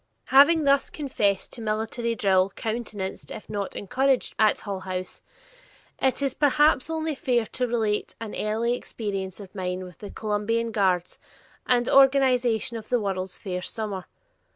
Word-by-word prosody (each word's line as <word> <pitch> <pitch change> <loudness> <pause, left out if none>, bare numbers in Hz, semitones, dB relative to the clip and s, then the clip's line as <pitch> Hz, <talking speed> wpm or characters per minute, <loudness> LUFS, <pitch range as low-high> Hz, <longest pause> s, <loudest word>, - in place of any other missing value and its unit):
Having 290 +5 +6
thus 280 -1 +3
confessed 205 -10 -1
to 235 - -4
military 225 +2 -2
drill 190 -2 +3
countenanced 215 -4 -4
if - - -8
not 205 -2 -4
encouraged 260 +5 +1
at 215 -1 +3
Hull 200 -2 -4
House, 185 -1 -5 0.8
it 265 +1 +1
is 275 -2 0
perhaps 295 0 +3
only 320 -1 -1
fair 245 -4 0
to 250 +3 -2
relate 220 -3 -1
an 225 -2 -6
early 225 +3 0
experience 195 -6 -4
of 195 -2 -11
mine 185 -1 -3
with 180 -2 -12
the 205 - -8
"Columbian 220 +2 -1
Guards," 185 -4 0 0.5
and 245 -1 +3
organization 255 -4 +4
of 220 - -10
the 245 - +2
World's 190 -3 -2
Fair 180 -2 -4
summer. 200 -2 -4
220 Hz, 150 wpm, -25 LUFS, 195-255 Hz, 0.8 s, Having